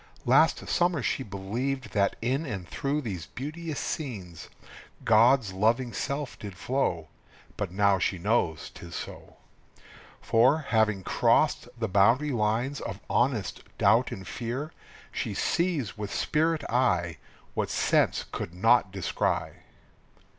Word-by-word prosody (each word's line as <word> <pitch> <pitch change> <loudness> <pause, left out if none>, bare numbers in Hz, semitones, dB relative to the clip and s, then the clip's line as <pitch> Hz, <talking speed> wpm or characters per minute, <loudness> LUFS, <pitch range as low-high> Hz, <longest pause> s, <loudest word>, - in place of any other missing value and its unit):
_) - - -25 0.2
Last - - +4
summer 175 -6 +1
she - - 0
believed 120 +6 -3
that 100 -1 +2
in 130 +6 0
and 100 - -5
through 140 +7 -2
these 95 - -5
beauteous 155 +3 -5
scenes 100 - -5 0.6
God's 115 -1 +5
loving 115 +5 +1
self 140 -1 -3
did 100 -4 -8
flow, 85 - -1 0.5
But 100 -4 -3
now 100 0 +3
she 95 - 0
knows 85 - 0
'tis 85 0 -10
so. - - -8 0.8
For, 120 +6 +4
having 110 -4 +2
crossed - - +2
the 115 -1 -1
boundary 115 +9 +3
lines 120 +4 0
of - - -5
honest 120 - 0 0.2
doubt 115 +6 +4
and 95 -1 -7
fear, 130 +6 -4 0.4
She - - -3
sees 160 - 0
with 105 -1 -4
spirit 160 0 +1
eye 90 -10 +1 0.4
What - - -1
sense - - +2
could 85 - -5
not 115 +1 +4
descry. 95 -2 -1
115 Hz, 130 wpm, -28 LUFS, 100-135 Hz, 0.8 s, God's